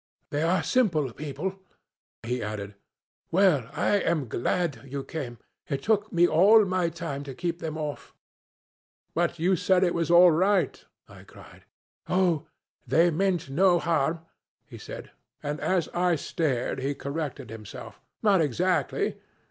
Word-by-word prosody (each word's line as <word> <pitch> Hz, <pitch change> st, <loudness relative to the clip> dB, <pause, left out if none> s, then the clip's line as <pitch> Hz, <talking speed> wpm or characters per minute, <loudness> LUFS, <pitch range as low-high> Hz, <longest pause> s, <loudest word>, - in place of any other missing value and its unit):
'They 145 Hz, -, -1 dB
are 170 Hz, +1 st, +2 dB
simple 160 Hz, -, +1 dB
people,' 155 Hz, +8 st, -5 dB, 0.6 s
he 125 Hz, +2 st, -2 dB
added; 105 Hz, -1 st, -5 dB, 0.6 s
'well, 165 Hz, -, +3 dB
I 180 Hz, +7 st, +1 dB
am 160 Hz, -8 st, 0 dB
glad 140 Hz, +3 st, -1 dB
you 135 Hz, 0 st, -5 dB
came. 130 Hz, -7 st, -6 dB, 0.3 s
It 140 Hz, -2 st, -2 dB
took 215 Hz, -1 st, +1 dB
me 175 Hz, 0 st, +4 dB
all 205 Hz, +7 st, +6 dB
my 185 Hz, -2 st, 0 dB
time 165 Hz, -4 st, -5 dB
to 135 Hz, -2 st, -8 dB
keep 170 Hz, +1 st, -3 dB
them 160 Hz, -2 st, -4 dB
off.' 150 Hz, -2 st, -5 dB, 1.0 s
'But 170 Hz, 0 st, 0 dB
you 180 Hz, +4 st, +2 dB
said 180 Hz, +1 st, +2 dB
it 175 Hz, -, +2 dB
was 170 Hz, -1 st, -1 dB
all 175 Hz, +1 st, +8 dB
right,' 190 Hz, +4 st, +1 dB, 0.2 s
I -, -, -14 dB
cried. -, -, -16 dB, 0.4 s
'Oh, 180 Hz, -5 st, +1 dB, 0.4 s
they 170 Hz, +2 st, +4 dB
meant 175 Hz, -3 st, 0 dB
no 180 Hz, +4 st, +4 dB
harm,' 165 Hz, -1 st, 0 dB, 0.4 s
he -, -, -12 dB
said; -, -, -9 dB, 0.3 s
and 145 Hz, +1 st, -3 dB
as 185 Hz, -4 st, 0 dB
I 175 Hz, 0 st, +1 dB
stared 140 Hz, -5 st, -2 dB
he 140 Hz, +2 st, -2 dB
corrected 140 Hz, -6 st, -5 dB
himself, 110 Hz, -2 st, -10 dB, 0.2 s
'Not 200 Hz, -5 st, +4 dB
exactly.' 175 Hz, +6 st, 0 dB
165 Hz, 145 wpm, -27 LUFS, 140-180 Hz, 1.0 s, all